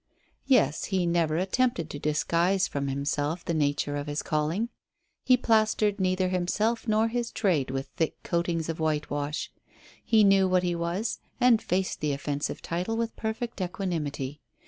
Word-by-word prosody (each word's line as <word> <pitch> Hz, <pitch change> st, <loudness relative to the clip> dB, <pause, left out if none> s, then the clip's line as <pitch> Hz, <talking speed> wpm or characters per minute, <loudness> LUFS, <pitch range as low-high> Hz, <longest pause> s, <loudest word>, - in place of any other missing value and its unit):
Yes, 205 Hz, -, +3 dB
he 190 Hz, -3 st, 0 dB
never 170 Hz, -2 st, +1 dB
attempted 190 Hz, -1 st, +1 dB
to 145 Hz, -, -6 dB
disguise 170 Hz, +6 st, +1 dB
from 140 Hz, -1 st, -3 dB
himself 145 Hz, +4 st, -2 dB
the 170 Hz, -, -1 dB
nature 145 Hz, -1 st, 0 dB
of 145 Hz, 0 st, -4 dB
his 145 Hz, +1 st, -2 dB
calling. 160 Hz, +9 st, 0 dB, 0.5 s
He 255 Hz, -1 st, +5 dB
plastered 215 Hz, -3 st, +2 dB
neither 185 Hz, 0 st, +1 dB
himself 210 Hz, +6 st, 0 dB
nor 215 Hz, +1 st, +3 dB
his 235 Hz, 0 st, -2 dB
trade 175 Hz, -, +1 dB
with 135 Hz, +1 st, -2 dB
thick 160 Hz, -, 0 dB
coatings 170 Hz, -1 st, -1 dB
of 165 Hz, 0 st, -4 dB
whitewash. 150 Hz, -1 st, -2 dB, 0.5 s
He 220 Hz, -2 st, +4 dB
knew 195 Hz, -1 st, +5 dB
what 185 Hz, -1 st, +2 dB
he 175 Hz, -1 st, 0 dB
was, 170 Hz, +6 st, -2 dB, 0.2 s
and 245 Hz, -3 st, +5 dB
faced 185 Hz, -2 st, -1 dB
the 150 Hz, -1 st, 0 dB
offensive 145 Hz, +1 st, -3 dB
title 180 Hz, +7 st, -2 dB
with 230 Hz, 0 st, -2 dB
perfect 220 Hz, 0 st, -4 dB
equanimity. 150 Hz, -7 st, -3 dB
175 Hz, 155 wpm, -27 LUFS, 150-215 Hz, 0.5 s, He